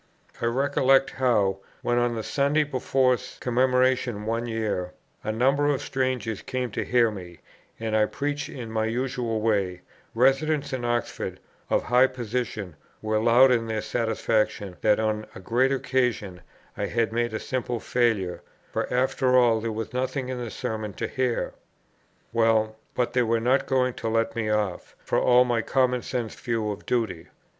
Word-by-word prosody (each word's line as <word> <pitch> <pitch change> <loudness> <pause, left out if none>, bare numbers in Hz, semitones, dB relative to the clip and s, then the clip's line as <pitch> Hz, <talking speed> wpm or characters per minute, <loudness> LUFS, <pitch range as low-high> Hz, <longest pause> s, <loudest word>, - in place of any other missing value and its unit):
I 115 - +1
recollect 135 +1 +3
how, 105 -7 +1 0.2
when 120 0 +2
on 120 -1 +1
the 110 - -3
Sunday 145 +5 +2
before 130 -2 +1 0.2
Commemoration 125 -3 +1
one 115 +2 -1
year, 105 -6 -2 0.3
a 110 - -1
number 135 +6 +2
of 145 -2 +2
strangers 125 -6 -2
came 125 -2 -3
to - - -2
hear 120 -2 +3
me, 90 -4 -9 0.4
and 110 -1 -2
I 105 -1 +4
preached 145 0 -3
in 120 -4 -7
my 110 0 0
usual 120 -2 -2
way, 100 -5 0 0.3
residents 135 +3 +2
in 130 -2 -2
Oxford, 120 -1 -2 0.3
of - - +2
high 125 +3 +5
position, 120 -7 -4 0.3
were 110 0 +1
loud 120 +4 +6
in 115 -2 +1
their 110 -1 -2
satisfaction 110 -4 -1
that 105 -1 +3
on 110 -1 -1
a - - -8
great 120 +8 +1
occasion, 125 -9 -1 0.3
I - - -2
had 115 -1 0
made 120 -1 0
a - - -2
simple 125 -2 -3
failure, 105 -9 0 0.3
for - - -2
after 130 0 +2
all 115 -3 +4
there 115 0 -2
was 110 +1 -5
nothing 130 +1 -2
in 125 -1 -3
the 120 - -5
Sermon 110 -1 -4
to - - -3
hear. 125 -2 -1 0.8
Well, 110 -1 +2 0.2
but 120 -1 0
they 125 - +3
were 115 -1 +2
not 125 +4 +2
going 130 -2 +2
to 115 - -4
let 115 0 0
me 110 -2 -1
off, 105 -4 -2
for - - +1
all 125 0 +5
my 120 -2 +1
common 125 0 +1
sense 120 -3 -3
view 115 -3 -2
of 100 - -8
duty. 115 -9 -1
120 Hz, 165 wpm, -26 LUFS, 110-130 Hz, 0.8 s, loud